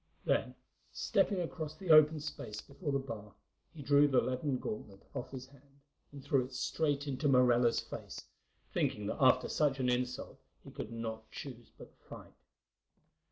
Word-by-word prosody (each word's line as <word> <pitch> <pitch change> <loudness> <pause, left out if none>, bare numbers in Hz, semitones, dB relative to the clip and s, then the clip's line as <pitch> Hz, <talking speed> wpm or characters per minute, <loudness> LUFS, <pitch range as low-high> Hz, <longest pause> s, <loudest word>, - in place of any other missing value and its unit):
Then, - - +1 0.4
stepping 195 -4 +1
across 155 -2 -5
the 175 +1 -1
open 155 0 +7
space 105 -8 -6
before 145 +4 -5
the 140 - +2
bar, 110 -7 -7 0.4
he 150 - -10
drew 145 +1 +5
the 130 -3 +4
leathern 130 +1 -1
gauntlet 105 -4 -6
off - - -5
his 130 -1 -7
hand 140 +1 -22 0.3
and 140 -2 -10
threw 140 -2 +2
it 130 +1 -9
straight 145 +2 0
into 140 +1 -1
Morella's 125 -3 +4
face, - - -8 0.5
thinking 105 - 0
that 105 - -3
after 130 -1 +5
such 140 -3 +1
an 125 -1 +1
insult 125 0 -2 0.2
he - - -11
could 110 - -6
not 110 -1 -5
choose 120 -4 -9
but - - -13
fight. - - -12
135 Hz, 160 wpm, -33 LUFS, 125-145 Hz, 0.5 s, open